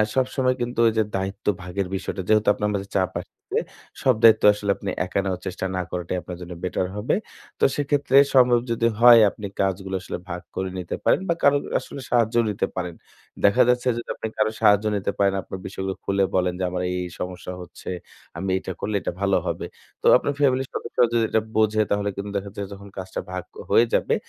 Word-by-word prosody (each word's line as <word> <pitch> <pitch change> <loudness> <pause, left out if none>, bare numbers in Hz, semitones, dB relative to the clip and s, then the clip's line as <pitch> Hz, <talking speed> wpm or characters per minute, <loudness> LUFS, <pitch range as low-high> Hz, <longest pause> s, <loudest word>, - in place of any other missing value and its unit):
সবসময় 130 0 +1
কিন্তু 120 0 -3
ওইযে 110 0 +2
দায়িত্ব 95 +1 -4 0.2
ভাগের 90 +1 -3
বিষয়টা 95 - -4
যেহেতু 110 0 +3
আপনার 105 0 -1
মাঝে 100 -1 -3
চাপ 95 -2 +1
আসছে। - - -12 0.7
সব 130 -2 +4
দায়িত্ব 110 -1 +7
আসলে 100 -1 -1
আপনি 100 - -5 0.2
একা 100 - -1
নেওয়ার 95 -2 -3
চেষ্টা 95 0 -4
না 95 - 0
করাটাই 90 0 -3
আপনার 90 +2 -8
জন্য 90 0 -7
বেটার 90 0 -1
হবে। 105 +3 0 0.4
তো - - -2
সেক্ষেত্রে 145 -2 +2 0.2
সম্ভব 125 -2 +6
যদি 115 0 +2
হয় 120 -1 +9
আপনি 100 0 -7
কাজগুলো 95 0 -1
আসলে - - -5
ভাগ 90 0 -4
করে 95 0 -2
নিতে 90 - -4
পারেন - - +4
বা, 170 - +4
কারো 145 0 +6 0.2
আসলে 140 - -9
সাহায্য 115 -1 +2
নিতে 100 - -1
পারেন। 90 -2 -4 0.5
দেখা 110 +6 +5
যাচ্ছে 125 +1 +2
যে - - -2
আপনি - - -4
কারোর 110 0 +1
সাহায্য 105 +1 +5
নিতে 100 0 -1
পারেন। 100 -1 +3
আপনার 95 - -8
বিষয়গুলো 95 0 -4
খুলে 100 0 +2
বলেন 90 -1 +2
যে - - -1
আমার 90 0 -3
এই, 90 - -2
এই - - -6
সমস্যা 90 0 -5
হচ্ছে। 85 - -10 0.5
আমি 95 +2 -3
এটা 95 - -6
করলে 105 +1 -2
এটা - - -2
ভালো 100 -1 +3
হবে। - - -2 0.4
তো - - -8
আপনার 145 - -2
ফ্যামিলির 135 -2 +2
সদস্যরা 120 - +1
যদি 115 -1 +3
এটা 110 - +2
বোঝে 110 0 +3
তাহলে 100 0 +1
কিন্তু 100 0 -5
দেখা 100 0 -4
যায় 100 -1 -4
যখন 100 0 -11
কাজটা 95 0 -5
ভাগ 90 -1 -4 0.3
হয়ে 120 - +5
যাবে, - - +2
100 Hz, 205 wpm, -24 LUFS, 95-115 Hz, 0.7 s, হয়